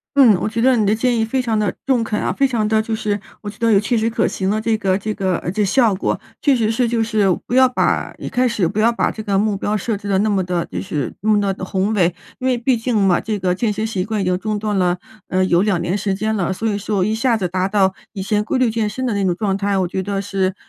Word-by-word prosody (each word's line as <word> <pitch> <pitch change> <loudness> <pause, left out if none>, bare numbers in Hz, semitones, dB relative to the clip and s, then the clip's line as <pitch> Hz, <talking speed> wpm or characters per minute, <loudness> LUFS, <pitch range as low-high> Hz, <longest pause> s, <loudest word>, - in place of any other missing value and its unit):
嗯， 260 -6 +7
我 210 - -1
觉 225 +1 -3
得 260 +1 +4
你 220 - +2
的 205 +2 +3
建 245 +2 +1
议 - - +2
非 225 +4 -1
常 230 -4 0
的 205 -3 +1
中 255 -4 +2
肯 215 -1 -2
啊， - - -1
非 275 - +2
常 230 -5 0
的 220 0 +2
就 220 0 -3
是， 210 -1 -2 0.2
我 210 - -9
觉 205 - -10
得 230 -1 +2
有 200 - +5
切 215 +4 -1
实 225 0 +1
可 225 0 +1
行 190 0 -2
的 215 +2 +1
这 220 0 +1
个 190 -3 +1
这 215 +2 -3
个， 190 -4 -1
呃， 175 - -4
这 210 +2 0
效 220 +1 +3
果。 190 - -1 0.2
确 280 -3 +4
实 225 -3 +1
是 235 +1 +1
就 230 -1 +1
是， 215 -3 +1 0.2
不 - - -6
要 260 0 +6
把 250 - 0
一 - - -7
开 255 0 +1
始 210 -7 0
不 205 +5 -3
要 225 +2 +4
把 235 - 0
这 220 - -7
个 200 -2 0
目 210 0 +1
标 210 +2 -1
设 220 +2 -2
置 200 0 -8
得 195 - +2
那 215 +2 +2
么 195 -3 +1
的 175 -1 -2
就 90 0 -5
是 135 +5 -3
那 215 - -1
么 210 -1 +4
的 190 - -8
宏 190 +3 -1
伟， 180 -3 +2 0.2
因 260 - -2
为 255 -1 +2
毕 250 +2 +1
竟 230 +1 -2
嘛， 195 -3 +3
这 215 -2 -2
个 185 -1 0
健 215 +4 0
身 215 +2 -2
习 200 -5 -2
惯 215 +2 -2
已 - - 0
经 180 0 +1
中 215 +1 -2
断 210 0 -2
了， 180 -2 +1 0.3
嗯， 185 0 +1
有 175 0 +3
2 200 -3 +1
年 175 +2 -1
时 200 -1 -1
间 215 +2 -1
了。 190 -4 -1
所 215 +4 -2
以 205 -2 -1
说 200 -2 0
一 215 - 0
下 230 +1 +1
子 185 - -1
达 185 +1 -1
到， 195 -2 +2 0.2
以 195 -3 -4
前 210 +2 0
规 260 - -1
律 255 -3 +2
健 220 -1 -1
身 255 +5 -4
的 240 - 0
那 200 -1 0
种 180 -2 +1
状 195 0 -1
态， 200 0 0
我 185 -2 +1
觉 190 - -3
得 200 +1 -2
是 195 -1 -1
210 Hz, 325 characters per minute, -19 LUFS, 190-225 Hz, 0.3 s, 嗯